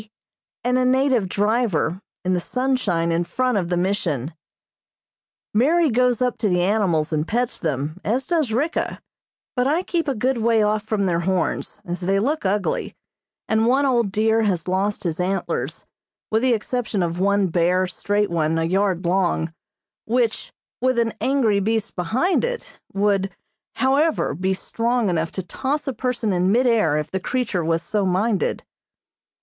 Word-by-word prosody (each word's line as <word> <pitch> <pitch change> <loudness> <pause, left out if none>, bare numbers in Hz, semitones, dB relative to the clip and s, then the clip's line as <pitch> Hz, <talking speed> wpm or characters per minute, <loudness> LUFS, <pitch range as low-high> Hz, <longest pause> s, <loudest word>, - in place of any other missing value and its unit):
and 250 +1 +2
a - - +2
native 255 -5 +2
driver 205 -4 0 0.2
in 185 - +2
the 180 - 0
sunshine 235 -10 0
in 165 +1 +1
front 255 +7 0
of 185 -4 0
the 175 - 0
Mission. 175 - -1 1.2
Mary 305 +7 +3
goes 250 +1 +2
up 250 -2 -1
to 215 - +1
the 180 -1 +2
animals 180 -6 +1
and 155 +1 0
pets 245 +2 -1
them, 155 +1 -2
as 250 +6 0
does 320 -9 0
Ricka, 285 +9 -1 0.6
but 250 0 +2
I 320 +6 +1
keep 340 -4 -1
a 275 - 0
good 250 +3 0
way 225 -1 +3
off 210 0 +1
from 210 -1 -1
their 170 -2 +1
horns, 180 0 -2
as 175 +1 -4
they 195 +2 +1
look 275 0 0
ugly, 200 0 -1 0.5
and 220 +1 +2
one 270 +3 +3
old 235 -6 +2
deer 220 +2 +2
has 185 -6 0
lost 195 +3 0
his 170 -2 -2
antlers, 175 -6 -2 0.5
with 220 +1 +2
the 255 -1 +3
exception 220 -3 -1
of 170 +1 -2
one 200 +1 +3
bare, 180 +2 +2
straight 205 +2 -1
one 160 -1 +1
a 165 - +1
yard 185 +1 0
long, 170 -3 +1 0.5
which, 235 -1 0 0.3
with 255 -1 +2
an 230 -1 +1
angry 250 -7 +2
beast 220 +2 -1
behind 240 - +1
it, 485 0 -4
would, 195 -1 +1 0.5
however, 275 +6 +2
be 185 +5 -1
strong 230 +1 0
enough 165 -1 -1
to 190 - -4
toss 275 - -3
a 270 - -1
person 240 -3 -1
in 180 +1 +2
mid 245 +4 +3
air 215 -11 +3
if 150 - -3
the 190 - -1
creature 205 -4 -1
was 165 +1 0
so 205 +3 -1
minded. 190 +1 0
205 Hz, 165 wpm, -22 LUFS, 180-250 Hz, 1.2 s, Mary